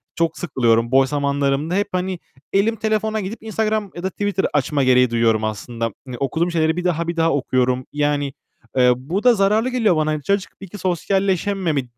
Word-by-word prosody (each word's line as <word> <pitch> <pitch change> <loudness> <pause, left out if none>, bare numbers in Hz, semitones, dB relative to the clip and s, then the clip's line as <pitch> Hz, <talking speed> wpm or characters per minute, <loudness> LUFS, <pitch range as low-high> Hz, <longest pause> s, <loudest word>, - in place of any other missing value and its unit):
Çok 165 -1 0
sıkılıyorum. 115 -7 +1
Boş 135 0 +4
zamanlarımda 140 +3 0
hep, 205 - +1
hani 185 -1 -2 0.3
elim 215 +4 +2
telefona 220 0 -1
gidip 210 +3 -6
Instagram 215 -2 -1
ya 175 - -7
da 190 - 0
Twitter 205 0 -1
açma 145 0 +1
gereği 125 -1 +4
duyuyorum 115 -2 +2
aslında. 115 +1 -3
Hani 125 -2 -7
okuduğum 165 +5 -1
şeyleri 160 0 +1
bir 180 - -2
daha, 170 -2 0
bir 170 0 -3
daha 165 0 +3
okuyorum. 130 -2 0
Yani, 145 -2 0 0.4
eee, 125 -1 +5
bu 165 - -3
da 245 -1 +6
zararlı 210 +4 +2
geliyor 225 -8 +2
bana. 155 -1 0
Dışarı 200 +7 +1
çıkıp 190 - -15
1-2 195 +1 -9
sosyalleşememe, 190 -3 0
165 Hz, 180 wpm, -20 LUFS, 135-195 Hz, 0.4 s, da